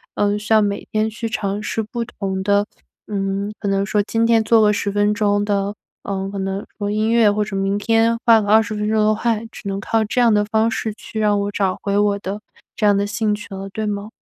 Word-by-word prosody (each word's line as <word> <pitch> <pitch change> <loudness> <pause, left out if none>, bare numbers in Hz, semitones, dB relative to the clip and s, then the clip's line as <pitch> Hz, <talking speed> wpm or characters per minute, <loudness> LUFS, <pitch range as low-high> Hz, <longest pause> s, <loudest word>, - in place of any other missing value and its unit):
呃， 205 0 +1
像 215 0 +3
每 200 -1 -3
天 215 0 +1
去 230 +1 -5
尝 205 -1 -2
试 220 +1 -2
不 235 +2 -4
同 190 -3 -4
的， 205 +1 +2 0.4
嗯， 200 0 -2
可 - - -4
能 195 0 +1
说 210 0 +1
今 225 +2 0
天 230 -1 +4
做 225 0 +4
个 210 - +5
10 205 - -1
分 205 +1 +2
钟 205 -1 +1
的， 200 0 -1 0.3
呃， 195 -1 -3
可 200 - -5
能 195 +1 -3
说 205 -1 -2
音 215 +2 0
乐， 230 -2 +5
或 210 +1 0
者 205 -1 -6
明 195 +1 0
天 225 +2 +2
画 230 -2 +6
个 205 - -4
20 215 0 +4
分 210 0 -2
钟 220 - +1
的 215 - +4
画。 230 0 0
只 205 - -9
能 195 0 -2
靠 225 +2 +1
这 245 +4 0
样 235 -1 +5
的 210 0 +2
方 220 +1 +1
式， 220 -1 -3
去 215 +1 -8
让 210 -1 +2
我 200 0 -2
找 195 -2 0
回 200 0 0
我 205 -1 +2
的 200 +1 -5 0.4
这 215 - 0
样 205 - +5
的 200 +1 +1
兴 210 +1 -1
趣 205 - -10
了， 195 0 -6
对 215 +2 -4
吗？ 205 0 -3
210 Hz, 255 characters per minute, -20 LUFS, 200-220 Hz, 0.4 s, 画